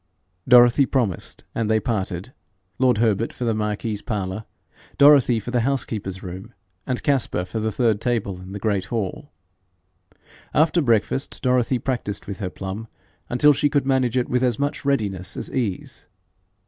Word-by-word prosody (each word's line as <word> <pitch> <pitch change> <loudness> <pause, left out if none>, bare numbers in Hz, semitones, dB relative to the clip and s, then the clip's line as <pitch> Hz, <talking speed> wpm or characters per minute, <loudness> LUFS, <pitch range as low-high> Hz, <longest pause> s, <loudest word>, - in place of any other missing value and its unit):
Dorothy 125 +2 +6
promised, 115 - -2
and 115 -2 -1
they 110 0 +3
parted 105 -1 -3 0.5
lord 125 -3 +3
Herbert 110 0 +1
for 125 - -5
the 115 - +1
marquis's 105 0 -2
parlour, 105 -2 -4 0.5
Dorothy 140 -5 +6
for 120 - -6
the 125 - +2
housekeeper's 110 -7 -2
room, 95 +1 -8 0.3
and 130 -1 -2
Caspar 135 -10 +1
for 110 - -4
the 110 0 -1
third 110 -1 +1
table 105 -7 -1
in 95 +1 -10
the 100 - -5
great 100 -2 -1
hall. 110 -6 -4 1.2
After 160 +3 +3
breakfast 120 +1 +1
Dorothy 125 0 +2
practised 120 -6 -3
with 100 0 -7
her 95 -4 -3
plum 95 +4 -6 0.4
until 145 +4 +5
she 145 +2 +1
could 140 -1 +1
manage 130 -3 +1
it 125 - +1
with 125 0 0
as 125 -4 +1
much 145 +2 -2
readiness 100 -10 -1
as - - -5
ease. 110 -8 -3
115 Hz, 160 wpm, -23 LUFS, 100-130 Hz, 1.2 s, Dorothy